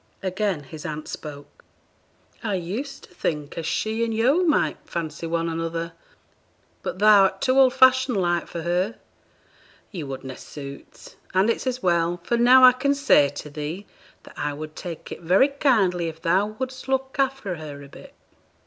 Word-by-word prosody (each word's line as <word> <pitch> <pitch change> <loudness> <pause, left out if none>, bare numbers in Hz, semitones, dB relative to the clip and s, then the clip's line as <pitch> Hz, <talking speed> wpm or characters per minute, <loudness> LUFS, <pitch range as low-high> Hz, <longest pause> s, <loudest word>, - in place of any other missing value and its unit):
Again 190 -4 -1
his 150 +3 -10
aunt 155 0 -5
spoke 145 -2 -9 0.8
'I 210 -3 -1
used 220 +11 -5
to - - -16
think 150 -2 -3
as 165 -1 -4
she 220 +1 -1
and 230 - -1
yo' 250 +10 +3
might 320 -4 +2
fancy 165 0 -5
one 165 0 -1
another, 165 0 -3 0.9
but - - -4
thou'rt 200 -2 +5
too 260 +4 +2
old 260 -2 +5
fashioned 260 -2 +5
like 175 -2 0
for 170 - -6
her; 180 +6 0 1.0
ye 180 - -5
would 135 -2 -6
na' 130 -1 -6
suit; 140 +1 -11 0.2
and 195 +5 +4
it's 245 - -4
as 255 -1 -2
well, 170 -1 +1
for 235 - 0
now 250 +2 +6
I 255 - +11
can 280 +3 0
say 270 - +4
to 145 +1 -8
thee, 155 +7 -5 0.4
that - - -14
I 145 0 -2
would 155 +1 -8
take 170 -3 -8
it - - -7
very 185 - +4
kindly 210 - +2
if 160 0 -7
thou 185 +5 +2
would'st 260 0 -5
look 265 0 -1
after 265 -9 -1
her 145 -2 -8
a - - -11
bit.' - - -14
185 Hz, 175 wpm, -24 LUFS, 160-250 Hz, 1.0 s, I